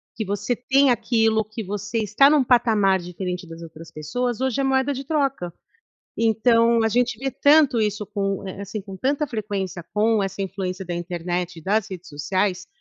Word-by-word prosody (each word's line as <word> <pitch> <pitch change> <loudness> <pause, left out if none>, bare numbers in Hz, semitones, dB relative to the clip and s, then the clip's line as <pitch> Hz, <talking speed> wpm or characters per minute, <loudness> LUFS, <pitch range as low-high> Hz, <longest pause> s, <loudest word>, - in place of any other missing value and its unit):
que 220 - -3
você 205 +5 -2
tem 270 +2 +3
aquilo, 225 -2 +2
que 215 +1 -7
você 205 +3 -4
está 215 +6 +4
num 295 -3 +4
patamar 220 -6 +3
diferente 180 +1 -5
das 165 +1 -10
outras 165 0 -12
pessoas, 240 - -3
hoje 265 0 0
é - - 0
moeda 270 +1 +1
de 270 +1 -5
troca. 275 - -1 0.7
Então 230 +1 +3
a - - +3
gente 240 -1 +1
vê 270 0 -2
tanto 285 -5 +4
isso 210 0 -1
com, 195 -1 -3
eh 190 - -7
eh, - - -5
assim, 205 +2 -5
com 195 -1 -10
tanta 285 +8 0
frequência 200 -6 -4
com 215 0 +2
essa 195 +1 -4
influência 190 0 -4
da 175 - -4
internet 175 0 -3
e - - -17
das 205 +3 0
redes 180 -2 -9
sociais, 180 +6 -1
210 Hz, 185 wpm, -23 LUFS, 185-245 Hz, 0.7 s, está